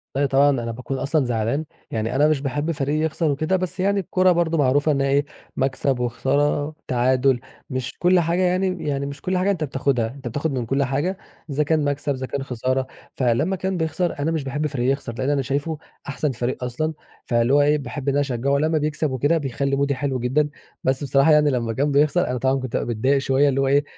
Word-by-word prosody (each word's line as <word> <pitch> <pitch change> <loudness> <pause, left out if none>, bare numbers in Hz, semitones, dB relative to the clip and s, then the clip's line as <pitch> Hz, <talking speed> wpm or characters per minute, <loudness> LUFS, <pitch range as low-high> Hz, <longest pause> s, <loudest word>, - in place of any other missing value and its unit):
أيوه 140 +1 +2
طبعًا، 140 +2 +4
أنا 120 -4 -1
باكون 125 +3 -5
أصلًا 140 +1 +1
زعلان، 120 +5 -1 0.3
يعني 110 +2 -2
أنا 145 +3 +4
مش 150 -3 +1
باحب 145 +4 -1
فريقي 145 -1 -1
يخسر 160 -1 0
وكده، 155 +6 0
بس 185 0 -2
يعني 200 +1 +2
الكورة 185 0 +2
برضه 170 -1 +1
معروفة 145 +2 +3
إنها 140 -1 +1
إيه، 140 +1 +2 0.3
مكسب 135 -1 0
وخسارة 145 +5 0
تعادل، 130 +1 +2 0.3
مش 130 -2 -3
كل 180 +1 +4
حاجة 170 +2 +1
يعني 185 -2 0
يعني 140 -1 -1
مش 140 0 -7
كل 185 0 -1
حاجة 190 +2 +2
أنت 175 -5 -2
بتاخدها، 135 -4 0
أنت 135 -3 -8
بتاخد 145 +6 -2
من 125 -3 -2
كل 135 +4 +1
حاجة 145 +9 -1 0.3
إذا 145 +2 +1
كان 155 0 +1
مكسب، 145 0 -1
إذا 130 -1 -4
كان 140 0 -3
خسارة. 130 +1 -1 0.3
فلما 135 +9 +1
كان 190 0 -2
بيخسر، 160 0 -1
أنا 155 +3 0
مش 160 -4 -1
باحب 145 +3 -2
فريقي 130 -3 -1
يخسر، 135 -4 -3
لأن 130 +2 -1
أنا 145 -1 +2
شايفه 145 +4 -2 0.3
أحسن 145 0 -1
فريق 125 +1 -3
أصلًا، 155 +6 -2 0.3
فاللي 120 +2 +2
هو 145 - +6
إيه 150 +1 +3
باحب 140 0 -6
إن - - +1
أنا 145 - +2
أشجعه 140 0 0
لمّا 155 +2 +1
بيكسب 150 -1 -1
وكده، 145 +6 +2
بيخلي 140 -1 -1
مودي 140 0 +1
حلو 130 -1 -2
جدًا. 145 +5 +1 0.3
بس 130 +2 +1
بصراحة 140 +3 +4
يعني 150 -1 +5
لما 115 -3 -1
كان 145 +5 0
بيخسر، 150 +5 +3
أنا 125 0 -1
طبعًا 130 +2 +1
كنت 130 -2 -6
بابقى - - -3
متضايق 135 +6 +2
شوية، 135 +1 +2
اللي 135 0 +1
هو 135 - +1
إيه 140 +1 +3
140 Hz, 220 wpm, -22 LUFS, 130-155 Hz, 0.3 s, هو